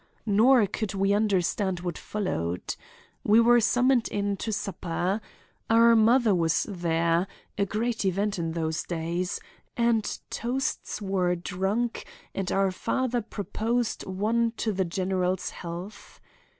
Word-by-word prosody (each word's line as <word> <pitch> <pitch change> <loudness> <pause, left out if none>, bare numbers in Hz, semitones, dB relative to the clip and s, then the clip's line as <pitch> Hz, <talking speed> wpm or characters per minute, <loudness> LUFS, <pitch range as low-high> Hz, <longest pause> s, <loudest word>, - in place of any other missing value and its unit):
Nor 225 +3 +5
could 200 0 -3
we 195 +1 +2
understand 190 -2 +1
what 175 -2 -3
followed. 90 - -3 0.5
We 215 +2 +5
were 240 +1 +6
summoned 245 +1 +3
in 205 -1 -1
to 220 - -3
supper. 190 0 -2 0.5
Our 230 +1 +6
mother 225 0 +5
was 165 -3 +2
there—a 170 +2 -1
great 225 +3 -1
event 200 +1 0
in 165 -1 -2
those 160 -1 -1
days—and 180 +6 -2
toasts 245 -3 -2
were 185 -2 +1
drunk 195 +7 -2 0.3
and 195 -2 -2
our 195 -1 +2
father 245 +5 -1
proposed 225 +2 -2
one 225 +5 0
to 220 - 0
the 190 -1 0
general's 185 +1 -1
health. 175 +4 -8
200 Hz, 120 wpm, -27 LUFS, 180-225 Hz, 0.5 s, were